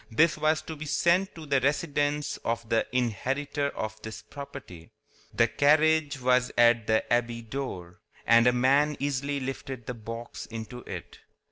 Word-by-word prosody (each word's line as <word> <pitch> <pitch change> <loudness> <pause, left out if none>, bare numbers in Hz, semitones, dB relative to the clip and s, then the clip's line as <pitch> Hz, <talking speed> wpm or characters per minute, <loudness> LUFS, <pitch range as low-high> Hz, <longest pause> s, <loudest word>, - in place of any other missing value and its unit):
This 155 +8 +3
was 155 0 +1
to 160 - -7
be 155 +1 -7
sent 175 +5 +2
to 160 -2 -9
the 140 -2 +2
residence 145 +1 0
of 115 0 -3
the 115 0 +1
inheritor 135 +4 -1
of 110 -4 -5
this 110 0 -8
property. 135 - -10 0.4
The - - +3
carriage 150 0 +3
was 125 0 +2
at 120 -1 +5
the 110 0 +3
abbey 120 -1 0
door, 110 -8 -6 0.3
and 115 +1 +6
a - - +6
man 140 +4 +3
easily 140 0 -1
lifted 135 -2 -6
the 125 - -4
box 115 +1 -7
into 115 +1 -7
it. - - -8
130 Hz, 155 wpm, -28 LUFS, 115-145 Hz, 0.4 s, and